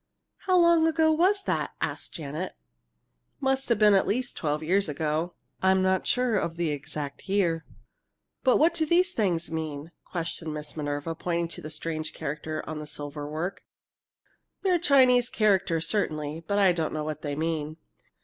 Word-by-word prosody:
"How 370 -1 +5
long 340 -2 +5
ago 320 0 +3
was 375 +5 +3
that?" - - -1
asked - - -4
Janet. 155 +3 -4 0.9
"Must 270 -1 0
have 235 - +3
been 210 -1 +6
at 195 - +3
least 245 +4 -1
twelve 150 0 -1
years 190 +2 +2
ago. 155 +3 -1 0.3
I'm 190 0 +4
not 190 0 +1
sure 250 -4 +2
of 170 -2 -3
the 170 -3 0
exact 145 +3 -6
year." 170 -5 +1 0.8
"But 255 - +5
what 330 +2 +4
do 330 -1 +1
these 360 +4 +3
things 175 - 0
mean?" 160 -1 -4
questioned 165 -2 -4
Miss 150 0 -6
Minerva, 145 +1 -3
pointing 170 0 -2
to - - -8
the 155 - -7
strange 155 0 -4
characters 155 +2 -4
in 155 0 -4
the 150 - -7
silver 145 0 -6
work. 165 +5 -3 1.0
"They're 365 -3 +3
Chinese 255 -6 +5
characters, 190 -6 +2
certainly, 155 -6 -2
but 200 - +1
I 195 -2 +5
don't 165 -3 -1
know 155 -1 -2
what 155 -1 -4
they 145 -2 -3
mean. 155 0 -2
170 Hz, 170 wpm, -27 LUFS, 155-235 Hz, 1.0 s, been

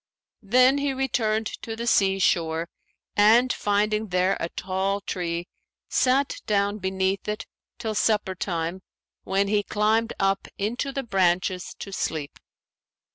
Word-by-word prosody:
Then 255 +6 +4
he 280 -1 0
returned 225 -5 0 0.2
to 225 - -5
the 230 +1 -4
sea 195 -4 +3
shore 165 -3 +1 0.5
and, 230 +5 +5
finding 210 +1 0
there 185 +1 +2
a 165 - -2
tall 190 +2 -1
tree, 175 -3 -3 0.4
sat 265 +2 +2
down 205 0 +1
beneath 190 +1 -1
it 210 0 -3 0.3
till 220 -1 -3
supper 210 -2 +1
time 175 -1 -3 0.4
when 195 +1 +1
he 205 0 +2
climbed 220 +3 +1
up 195 0 +1
into 240 +7 -2
the 275 0 -3
branches 185 -3 0
to 200 - -7
sleep. 155 -5 -3
200 Hz, 130 wpm, -25 LUFS, 190-225 Hz, 0.5 s, and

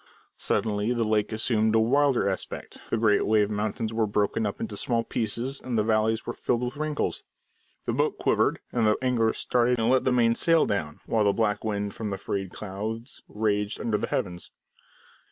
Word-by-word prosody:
Suddenly 105 +2 0
the 120 -1 0
lake 110 -1 +1
assumed 110 0 +1
a - - +5
wilder 135 +1 +3
aspect, 95 -1 -4
the - - +1
great 110 -2 +3
wave 105 -1 +3
mountains 110 +2 -2
were 110 -1 +1
broken 105 +1 0
up 100 - -5
into 105 - -4
small 115 +3 0
pieces, 120 +5 -2
and 125 -3 -2
the 105 - +3
valleys 110 +1 +1
were - - -3
filled 120 0 -1
with 125 +1 -3
wrinkles. 155 0 -2 0.6
The - - -1
boat - - 0
quivered, - - +1
and 115 -3 +2
the 105 - +3
angler 120 -4 +2
started 125 0 +1
and 115 +1 +2
let 130 -1 +3
the 130 - +2
main 120 -2 +4
sail 165 +6 +3
down, 80 -8 -3
while 110 -2 +1
the 100 - +4
black 105 -2 0
wind 105 -2 -2
from 110 -2 -4
the 100 - -3
frayed 95 -1 -3
clouds 110 +6 -6
raged 105 -1 -1
under 110 -3 0
the - - -2
heavens. 90 -3 -3
110 Hz, 190 wpm, -26 LUFS, 105-120 Hz, 0.6 s, a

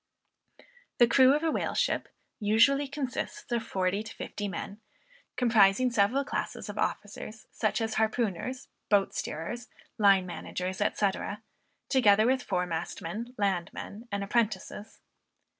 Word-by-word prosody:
The 240 - +7
crew 260 +3 +6
of 300 - -1
a 325 - +2
whale - - -1
ship - - +1 0.3
usually 230 +7 +4
consists 280 +6 -4
of 235 -1 +1
forty 190 -1 -1
to 220 +1 -9
fifty 205 - -5
men, 200 +1 -6 0.5
comprising 235 0 +4
several 235 +5 +2
classes - - -4
of - - -6
officers, 215 0 -4
such 215 - 0
as 225 -1 -1
harpooners, 220 +2 -1 0.2
boat 200 -2 +3
steerers, 235 +10 -4 0.3
line 195 -3 +5
managers, 180 +1 -5
&c. 205 -1 +2 0.8
together 215 -5 +5
with 260 +1 +2
fore 180 -5 -1
mastmen, 175 +7 -5
landmen 200 +3 -3
and 200 0 -1
apprentices. 210 -1 -2
215 Hz, 125 wpm, -29 LUFS, 195-245 Hz, 0.8 s, The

